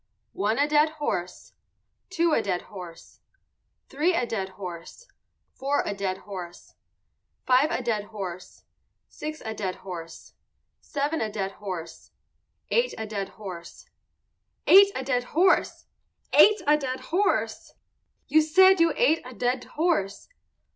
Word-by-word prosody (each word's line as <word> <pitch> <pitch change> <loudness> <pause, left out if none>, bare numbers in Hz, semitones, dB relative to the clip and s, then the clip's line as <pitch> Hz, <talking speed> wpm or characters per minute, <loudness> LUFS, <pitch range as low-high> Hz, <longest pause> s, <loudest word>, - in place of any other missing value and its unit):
One 210 +3 0
a 285 - +3
dead 300 +1 +3
horse. 180 -12 -4 0.6
Two 340 -2 +1
a - - +3
dead 185 -4 -2
horse. 180 -4 -11 0.7
Three 320 +6 +1
a 250 - +1
dead 195 -5 -3
horse. 180 - -9 0.5
Four 280 +2 0
a - - -2
dead 195 -2 -2
horse. 180 -3 -9 0.7
Five 260 +4 +4
a 255 - -2
dead 215 -4 -1
horse. 190 -4 -8 0.5
Six 310 0 -7
a 220 - -3
dead 195 -4 -3
horse. 170 -3 -9 0.5
Seven 290 +3 -2
a 215 -1 -2
dead 195 -2 -3
horse. 185 -5 -8 0.6
Eight 485 +1 +1
a 220 - -4
dead 205 -2 -4
horse. 185 -5 -10 0.8
Eight 395 +1 +9
a 260 - -3
dead 250 -2 0
horse! 370 +3 +3 0.5
Ate 420 -3 +6
a 300 +1 +5
dead 260 -3 -4
horse! 400 +4 0 0.5
You 315 - +5
said 375 +4 +5
you 335 0 +4
ate 405 -10 +3
a 255 -1 -10
dead 245 +1 -1
horse. 310 - -1
245 Hz, 135 wpm, -26 LUFS, 195-310 Hz, 0.8 s, Eight